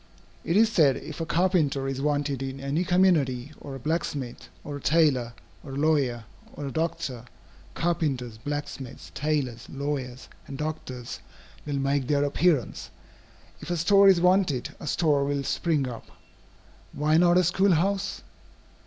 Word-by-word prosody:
It 170 - +1
is 220 +1 +5
said 145 -10 +4
if 155 +1 -7
a 165 - -3
carpenter 165 -6 +1
is 135 0 -3
wanted 145 -2 0
in 135 0 -4
any 140 +5 -1
community, 155 -8 +2
or 140 -2 -7
a - - -7
blacksmith, 145 -3 -3
or 145 -1 -5
a - - -10
tailor, 140 -7 +2 0.3
or 135 - -8
a - - -4
lawyer, 140 -6 +1 0.3
or 145 - -6
a 135 - -4
doctor, 130 -6 -3 0.5
carpenters, 140 -10 -1
blacksmiths, 145 -1 -6
tailors, 140 -6 -2
lawyers, 135 -3 -4 0.2
and 135 - -7
doctors 135 -5 -5 0.5
will 145 -1 -1
make 135 -1 0
their 145 0 +2
appearance. 145 -2 +1 0.7
If - - -9
a 175 - 0
store 195 +4 +5
is 190 -3 +6
wanted, 180 -7 +2
a - - -8
store 150 -2 +2
will 140 0 -1
spring 150 -2 0
up. 120 -3 -8 0.9
Why 155 +2 +2
not 175 +1 +5
a 185 - +5
school 185 +3 +3
house? 195 +4 0
145 Hz, 155 wpm, -26 LUFS, 135-170 Hz, 0.9 s, is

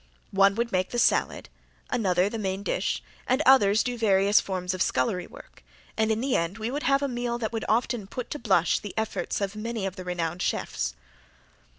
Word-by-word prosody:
One 195 0 +4
would 235 +1 -1
make 185 0 0
the 240 - -4
salad, 240 - +2 0.4
another 190 -6 +2
the 225 +2 -4
main 195 -1 -2
dish, - - -1 0.2
and 255 +2 +2
others 220 -6 +6
do 245 -1 -3
various 200 -1 +4
forms 185 -1 -3
of 185 - -4
scullery 175 +8 0
work, - - -15 0.3
and 220 0 +1
in 220 +1 0
the 265 0 0
end 170 +4 -1
we 225 +2 -3
would 290 +2 -3
have 275 0 +2
a - - +1
meal 240 -2 -2
that 235 -1 -3
would 225 - -3
often 225 -2 0
put 250 +4 -6
to 295 - -4
blush 190 -6 +2
the 205 -3 -8
efforts 220 -1 -2
of 200 +1 -2
many 220 -1 -3
of 190 -1 -4
the 185 - -6
renowned 175 -1 -3
chefs. - - -2
210 Hz, 205 wpm, -26 LUFS, 190-235 Hz, 0.4 s, others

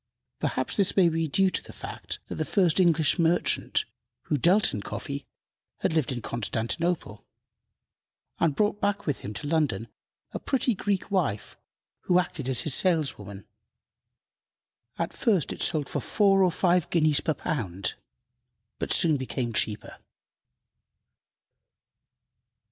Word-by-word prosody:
Perhaps - - -2
this 200 -1 +1
may 180 -3 +6
be 165 0 -1
due 190 +6 +2
to - - -1
the - - -13
fact - - -7
that - - -6
the - - -2
first 185 -4 +2
English 165 -4 +3
merchant 170 +1 +2 0.4
who - - -1
dealt 180 - +3
in 105 - -3
coffee 140 +6 -6 0.5
had - - 0
lived 155 -4 +1
in 120 -3 -4
Constantinople, 115 - -2 1.2
and 160 -4 +2
brought 210 0 0
back 205 0 0
with 145 -5 -1
him 100 - -6
to - - -6
London 145 -9 0 0.4
a - - -5
pretty 260 -2 0
Greek 200 0 -2
wife, 150 - -1 0.5
who 180 - +3
acted 150 -6 -1
as 130 - +3
his 155 - +2
saleswoman. 135 - +1 1.5
At 170 - -2
first 200 - +1
it - - -9
sold 155 -4 +2
for - - -2
four 195 -2 +3
or 180 - +3
five 180 -1 +1
guineas 155 -3 +2
per 160 - -1
pound, 100 - -3 0.9
but - - -3
soon 160 -3 +4
became 130 -2 -3
cheaper. 105 0 -1
160 Hz, 135 wpm, -27 LUFS, 130-185 Hz, 1.5 s, may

